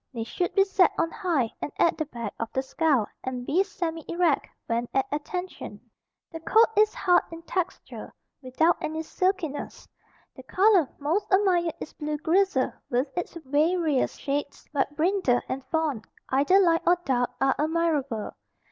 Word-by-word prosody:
They 225 Hz, -, -2 dB
should 355 Hz, +9 st, -3 dB
be 390 Hz, -, +6 dB
set 385 Hz, -2 st, +3 dB
on 330 Hz, -, 0 dB
high 325 Hz, -, 0 dB
and -, -, -4 dB
at 335 Hz, -, +3 dB
the 310 Hz, -, -3 dB
back 235 Hz, -7 st, -6 dB
of 230 Hz, -, -4 dB
the 265 Hz, -, 0 dB
skull 275 Hz, -5 st, +1 dB, 0.2 s
and 250 Hz, -1 st, -4 dB
be 340 Hz, +9 st, +2 dB
semi 340 Hz, -5 st, -4 dB
erect 340 Hz, -4 st, +1 dB, 0.2 s
when 235 Hz, +1 st, -1 dB
at 270 Hz, 0 st, +3 dB
attention. 355 Hz, +5 st, -5 dB, 0.5 s
The 325 Hz, -, -6 dB
coat 440 Hz, +8 st, +4 dB
is 425 Hz, +1 st, +3 dB
hard 360 Hz, -2 st, +4 dB
in 330 Hz, 0 st, -9 dB
texture, 365 Hz, 0 st, -4 dB, 0.3 s
without 285 Hz, +6 st, +2 dB
any 315 Hz, +1 st, -3 dB
silkiness. 360 Hz, -5 st, -2 dB, 0.5 s
The 260 Hz, -, -10 dB
color 370 Hz, +2 st, +3 dB
most 320 Hz, +8 st, -1 dB
admired 365 Hz, -4 st, +3 dB
is -, -, -8 dB
blue 300 Hz, 0 st, -3 dB
grizzle 330 Hz, -3 st, +1 dB, 0.2 s
with 255 Hz, +3 st, -1 dB
its 350 Hz, -1 st, -4 dB
various 305 Hz, +1 st, +1 dB
shades 285 Hz, 0 st, -4 dB
but 285 Hz, 0 st, 0 dB
brindle 335 Hz, -7 st, +2 dB
and 265 Hz, +1 st, -4 dB
fawn, 315 Hz, -8 st, -1 dB, 0.3 s
either 285 Hz, +9 st, +4 dB
light 335 Hz, -4 st, +3 dB
or 350 Hz, +1 st, +5 dB
dark 245 Hz, -2 st, +1 dB
are 270 Hz, 0 st, +3 dB
admirable. 300 Hz, -7 st, 0 dB
320 Hz, 160 wpm, -26 LUFS, 270-360 Hz, 0.5 s, be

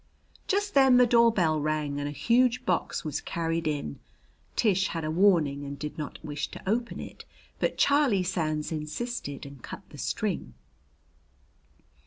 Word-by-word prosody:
Just 410 Hz, +1 st, 0 dB
then 265 Hz, -2 st, +6 dB
the 250 Hz, -, +7 dB
doorbell 225 Hz, -10 st, +4 dB
rang 150 Hz, -1 st, -1 dB
and 145 Hz, 0 st, -2 dB
a -, -, -4 dB
huge 245 Hz, -, +2 dB
box 180 Hz, -3 st, -1 dB
was 150 Hz, -, -2 dB
carried 165 Hz, -1 st, -2 dB
in. 145 Hz, -, -3 dB, 0.6 s
Tish 195 Hz, -3 st, +3 dB
had 165 Hz, -2 st, -4 dB
a 155 Hz, -, -1 dB
warning 160 Hz, -6 st, +3 dB
and 140 Hz, 0 st, -6 dB
did 150 Hz, +1 st, -5 dB
not 150 Hz, -3 st, -5 dB
wish 150 Hz, 0 st, -3 dB
to -, -, -10 dB
open 235 Hz, +4 st, -1 dB
it, -, -, -9 dB, 0.4 s
but -, -, 0 dB
Charlie 280 Hz, -10 st, +3 dB
Sands 155 Hz, -4 st, -1 dB
insisted 155 Hz, -, -4 dB
and 140 Hz, -2 st, -11 dB
cut -, -, -8 dB
the -, -, -12 dB
string. 65 Hz, -, -2 dB
165 Hz, 155 wpm, -28 LUFS, 150-235 Hz, 0.6 s, the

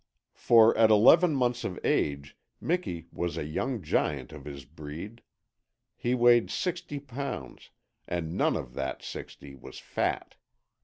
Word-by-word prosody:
For 115 Hz, -1 st, +5 dB
at 110 Hz, -1 st, +6 dB
eleven 150 Hz, +10 st, +6 dB
months 125 Hz, -2 st, 0 dB
of 90 Hz, -, -4 dB
age 70 Hz, -1 st, 0 dB, 0.2 s
Miki 160 Hz, -, -2 dB
was 85 Hz, -1 st, -3 dB
a -, -, -3 dB
young 115 Hz, -, -3 dB
giant 75 Hz, -3 st, -1 dB
of 75 Hz, -3 st, -11 dB
his 70 Hz, -3 st, -8 dB
breed. 80 Hz, -, -9 dB, 0.7 s
He 120 Hz, +1 st, -1 dB
weighed 120 Hz, -1 st, +5 dB
sixty 170 Hz, -5 st, -3 dB
pounds, 140 Hz, 0 st, -7 dB, 0.4 s
and 85 Hz, -1 st, -3 dB
none -, -, +2 dB
of -, -, -5 dB
that 65 Hz, 0 st, -4 dB
sixty 70 Hz, -1 st, -9 dB
was 70 Hz, -, -12 dB
fat. -, -, -3 dB
105 Hz, 140 wpm, -28 LUFS, 75-125 Hz, 0.7 s, at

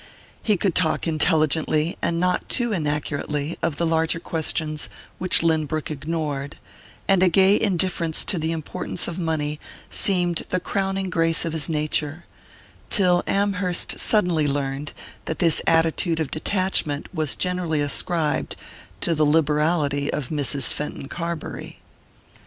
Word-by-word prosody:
He 210 Hz, -3 st, +2 dB
could 190 Hz, -1 st, 0 dB
talk 160 Hz, -2 st, +1 dB
intelligently 155 Hz, 0 st, +2 dB
and 170 Hz, 0 st, 0 dB
not 180 Hz, +1 st, 0 dB
too 240 Hz, -3 st, +1 dB
inaccurately 150 Hz, -1 st, -2 dB
of 145 Hz, -, -1 dB
the 170 Hz, -, 0 dB
larger 165 Hz, 0 st, +1 dB
questions 155 Hz, -2 st, -2 dB, 0.3 s
which 185 Hz, -2 st, +3 dB
Lynbrook 155 Hz, -2 st, 0 dB
ignored, 150 Hz, -1 st, -4 dB, 0.5 s
and 195 Hz, -2 st, +4 dB
a 185 Hz, -, +5 dB
gay 190 Hz, +3 st, +4 dB
indifference 175 Hz, -5 st, +1 dB
to 185 Hz, -, +1 dB
the 160 Hz, +1 st, -1 dB
importance 150 Hz, -, -4 dB
of 175 Hz, -, -5 dB
money 150 Hz, -3 st, -2 dB, 0.3 s
seemed 175 Hz, -4 st, +4 dB
the 185 Hz, -, 0 dB
crowning 195 Hz, 0 st, -2 dB
grace 165 Hz, 0 st, +1 dB
of 165 Hz, -, -3 dB
his 160 Hz, 0 st, -2 dB
nature, 155 Hz, +1 st, -1 dB, 0.6 s
till 180 Hz, -4 st, +3 dB
Amherst 195 Hz, -3 st, 0 dB
suddenly 175 Hz, -8 st, +3 dB
learned 140 Hz, 0 st, -2 dB, 0.3 s
that 160 Hz, -, -3 dB
this 165 Hz, -2 st, +3 dB
attitude 165 Hz, 0 st, +2 dB
of 155 Hz, -4 st, -2 dB
detachment 155 Hz, -4 st, 0 dB
was 155 Hz, -5 st, 0 dB
generally 180 Hz, -4 st, -1 dB
ascribed 150 Hz, +2 st, 0 dB, 0.5 s
to 170 Hz, -, +2 dB
the 155 Hz, -1 st, +2 dB
liberality 150 Hz, -1 st, +1 dB
of 140 Hz, -4 st, -3 dB
Mrs. 145 Hz, -2 st, 0 dB
Fenton 145 Hz, -2 st, -6 dB
Carbury. 170 Hz, -2 st, -5 dB
160 Hz, 135 wpm, -23 LUFS, 150-180 Hz, 0.6 s, a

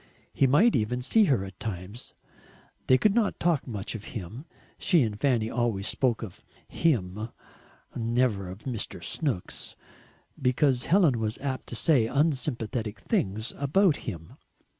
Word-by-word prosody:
He 135 Hz, -, +3 dB
might 195 Hz, -, +5 dB
even 115 Hz, +3 st, 0 dB
see 215 Hz, -, +4 dB
her 130 Hz, -, +1 dB
at 95 Hz, -1 st, -11 dB
times. 100 Hz, +2 st, -6 dB, 0.7 s
They 130 Hz, -, +6 dB
could 210 Hz, +8 st, +3 dB
not 225 Hz, -2 st, +1 dB
talk 165 Hz, -6 st, +1 dB
much 105 Hz, -5 st, -4 dB
of 110 Hz, -3 st, -7 dB
him 110 Hz, -, -8 dB, 0.3 s
she 170 Hz, -7 st, +4 dB
and 105 Hz, -2 st, -3 dB
Fanny 120 Hz, -6 st, +2 dB
always 115 Hz, -4 st, -1 dB
spoke 120 Hz, -4 st, +1 dB
of 100 Hz, -6 st, -9 dB, 0.3 s
"him," 110 Hz, -, 0 dB, 0.7 s
never 115 Hz, -4 st, 0 dB
of 95 Hz, +3 st, -9 dB
Mr. 115 Hz, -8 st, -4 dB
Snooks, 125 Hz, -, -3 dB, 0.7 s
because 130 Hz, 0 st, +2 dB
Helen 170 Hz, -, +4 dB
was 110 Hz, -1 st, -2 dB
apt 135 Hz, -2 st, -4 dB
to -, -, -6 dB
say 125 Hz, -3 st, +3 dB
unsympathetic 125 Hz, -6 st, -1 dB
things 110 Hz, +4 st, -1 dB
about 155 Hz, +4 st, +3 dB
him. 85 Hz, -9 st, -8 dB
120 Hz, 140 wpm, -27 LUFS, 105-140 Hz, 0.7 s, They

